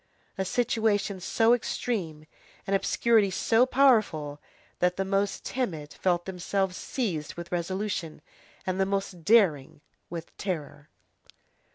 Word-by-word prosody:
A 190 Hz, -, -2 dB
situation 215 Hz, -3 st, 0 dB
so 225 Hz, +5 st, +3 dB
extreme, 185 Hz, -10 st, -2 dB, 0.4 s
an 195 Hz, -, -2 dB
obscurity 205 Hz, +2 st, +3 dB
so 225 Hz, +6 st, +3 dB
powerful, 215 Hz, -, +3 dB, 0.4 s
that 180 Hz, 0 st, +2 dB
the 195 Hz, -, 0 dB
most 195 Hz, +1 st, 0 dB
timid 165 Hz, -, -3 dB
felt 175 Hz, -2 st, 0 dB
themselves 190 Hz, 0 st, -1 dB
seized 180 Hz, -, -3 dB
with 170 Hz, 0 st, -8 dB
resolution, 175 Hz, -2 st, -3 dB, 0.4 s
and 185 Hz, 0 st, -2 dB
the 190 Hz, -, +2 dB
most 195 Hz, -3 st, -3 dB
daring 160 Hz, -11 st, +3 dB, 0.3 s
with 170 Hz, -1 st, -7 dB
terror. 155 Hz, -5 st, -5 dB
190 Hz, 120 wpm, -28 LUFS, 170-215 Hz, 0.4 s, so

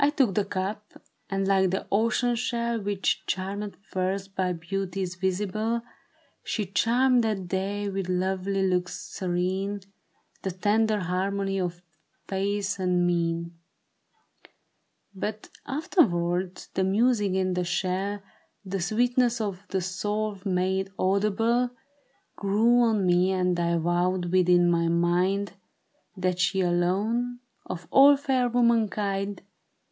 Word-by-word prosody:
" -, -, +4 dB
I 285 Hz, -, +5 dB
took 270 Hz, -9 st, +2 dB
the 205 Hz, +1 st, +1 dB
cup; 200 Hz, +2 st, -4 dB, 0.3 s
and, 195 Hz, 0 st, -1 dB
like 190 Hz, -1 st, +3 dB
the 190 Hz, -, -2 dB
ocean 230 Hz, +3 st, +2 dB
shell 235 Hz, -1 st, -1 dB
Which 200 Hz, -1 st, 0 dB
charmeth 200 Hz, +2 st, -3 dB
first 190 Hz, +1 st, -3 dB
by 185 Hz, -2 st, 0 dB
beauties 185 Hz, +2 st, -3 dB
visible. 210 Hz, +5 st, -1 dB, 0.6 s
She 210 Hz, -, -2 dB
charmed 240 Hz, +6 st, +3 dB
that 205 Hz, -5 st, -1 dB
day, 195 Hz, +2 st, -2 dB
with 195 Hz, -2 st, -3 dB
lovely 190 Hz, +1 st, 0 dB
looks 180 Hz, -1 st, -1 dB
serene, 190 Hz, +2 st, -2 dB, 0.6 s
The 190 Hz, -, -2 dB
tender 210 Hz, +3 st, +1 dB
harmony 195 Hz, +2 st, -1 dB
of 175 Hz, -1 st, -3 dB, 0.4 s
face 200 Hz, 0 st, -1 dB
and 180 Hz, -1 st, +2 dB
mien; 170 Hz, -1 st, -1 dB, 1.6 s
But 210 Hz, +2 st, -5 dB, 0.2 s
afterwards 185 Hz, -, 0 dB
the 190 Hz, -, +1 dB
music 205 Hz, 0 st, +2 dB
in 185 Hz, -1 st, +1 dB
the 180 Hz, 0 st, 0 dB
shell. 190 Hz, +3 st, -2 dB, 0.4 s
The 195 Hz, +1 st, -3 dB
sweetness 240 Hz, +5 st, +2 dB
of 200 Hz, -2 st, -4 dB
the 190 Hz, -, -1 dB
soul 205 Hz, +4 st, -2 dB
made 190 Hz, 0 st, 0 dB
audible, 215 Hz, +6 st, +2 dB, 0.7 s
Grew 220 Hz, +5 st, +3 dB
on 220 Hz, -5 st, +2 dB
me 180 Hz, +1 st, +3 dB
and 180 Hz, -1 st, +1 dB
I 170 Hz, 0 st, +1 dB
vowed 175 Hz, +1 st, 0 dB
within 180 Hz, -1 st, +4 dB
my 170 Hz, -1 st, +2 dB
mind. 180 Hz, +3 st, +1 dB, 0.6 s
That 185 Hz, -1 st, -1 dB
she 190 Hz, +1 st, +2 dB
alone, 205 Hz, +8 st, 0 dB, 0.3 s
of 180 Hz, -2 st, -6 dB
all 280 Hz, +1 st, +7 dB
fair 260 Hz, -3 st, +1 dB
womankind. 210 Hz, -5 st, +1 dB
195 Hz, 120 wpm, -26 LUFS, 180-215 Hz, 1.6 s, all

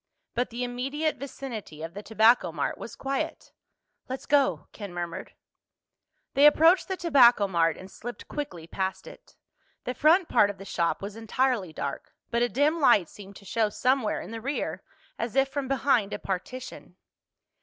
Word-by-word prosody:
But 245 Hz, +1 st, -1 dB
the 240 Hz, +2 st, -4 dB
immediate 270 Hz, +6 st, -2 dB
vicinity 235 Hz, -, -7 dB
of 165 Hz, +1 st, -6 dB
the 205 Hz, -, -7 dB
Tobacco 220 Hz, -3 st, +4 dB
Mart 150 Hz, -3 st, -3 dB
was -, -, -8 dB
quiet. 275 Hz, 0 st, -4 dB, 0.6 s
"Let's 260 Hz, +1 st, -5 dB
go," 285 Hz, -2 st, +2 dB
Ken 205 Hz, -3 st, -8 dB
murmured. 175 Hz, +1 st, -5 dB, 1.0 s
They 285 Hz, +2 st, +7 dB
approached 325 Hz, +5 st, +5 dB
the 380 Hz, -, -3 dB
Tobacco 245 Hz, -, +5 dB
Mart 165 Hz, -4 st, +1 dB
and 185 Hz, +1 st, -11 dB
slipped 240 Hz, +1 st, -8 dB
quickly 285 Hz, -, -5 dB
past 190 Hz, +2 st, -3 dB
it. -, -, -14 dB, 0.5 s
The 250 Hz, -, -3 dB
front 325 Hz, +7 st, +4 dB
part 205 Hz, -, +4 dB
of 205 Hz, -, -6 dB
the 195 Hz, -, -10 dB
shop 170 Hz, 0 st, -1 dB
was 200 Hz, +1 st, -6 dB
entirely 225 Hz, -4 st, 0 dB
dark, 140 Hz, -2 st, -6 dB, 0.2 s
but 235 Hz, 0 st, +1 dB
a 240 Hz, -, +2 dB
dim 295 Hz, +6 st, +2 dB
light 225 Hz, -, +4 dB
seemed 200 Hz, -1 st, -12 dB
to 200 Hz, -, -14 dB
show 220 Hz, +2 st, +1 dB
somewhere 250 Hz, 0 st, 0 dB
in -, -, -9 dB
the 225 Hz, 0 st, -6 dB
rear, 275 Hz, +5 st, -3 dB, 0.4 s
as 230 Hz, +1 st, -3 dB
if 270 Hz, 0 st, +3 dB
from 275 Hz, 0 st, -3 dB
behind 255 Hz, -6 st, +1 dB
a -, -, -2 dB
partition. 215 Hz, +7 st, -6 dB
235 Hz, 170 wpm, -27 LUFS, 195-275 Hz, 1.0 s, They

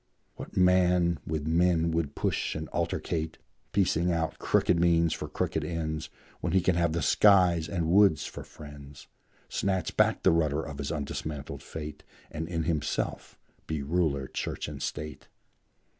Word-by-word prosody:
What -, -, -9 dB
man 90 Hz, -2 st, +4 dB
with 75 Hz, -2 st, -2 dB
men 85 Hz, 0 st, +2 dB
would 80 Hz, -3 st, -1 dB
push -, -, -1 dB
and 80 Hz, 0 st, -4 dB
altercate, 80 Hz, -1 st, -2 dB, 0.3 s
Piecing 90 Hz, -3 st, +2 dB
out 80 Hz, -1 st, -1 dB
crooked 85 Hz, -, +2 dB
means 85 Hz, -1 st, +3 dB
for -, -, -5 dB
crooked -, -, -2 dB
ends, 80 Hz, -2 st, -3 dB, 0.3 s
When -, -, -2 dB
he 95 Hz, -, +4 dB
can 90 Hz, +1 st, +2 dB
have 85 Hz, -2 st, +1 dB
the 85 Hz, -, -1 dB
skies 90 Hz, -5 st, +5 dB
and 85 Hz, -4 st, -1 dB
woods 95 Hz, -6 st, +5 dB
for -, -, -7 dB
friends, 75 Hz, -1 st, -12 dB, 0.4 s
Snatch 95 Hz, -4 st, -1 dB
back -, -, +2 dB
the -, -, +6 dB
rudder 80 Hz, -2 st, +1 dB
of 70 Hz, -3 st, -7 dB
his 70 Hz, -, -3 dB
undismantled 75 Hz, -1 st, -4 dB
fate, 75 Hz, -2 st, -7 dB, 0.3 s
And 80 Hz, +1 st, -4 dB
in 80 Hz, -2 st, -2 dB
himself 75 Hz, -2 st, -2 dB, 0.3 s
be 80 Hz, -3 st, -2 dB
ruler, 75 Hz, -3 st, 0 dB
church, -, -, -4 dB
and 75 Hz, -2 st, -7 dB
state? 75 Hz, 0 st, -5 dB
80 Hz, 155 wpm, -28 LUFS, 75-85 Hz, 0.4 s, the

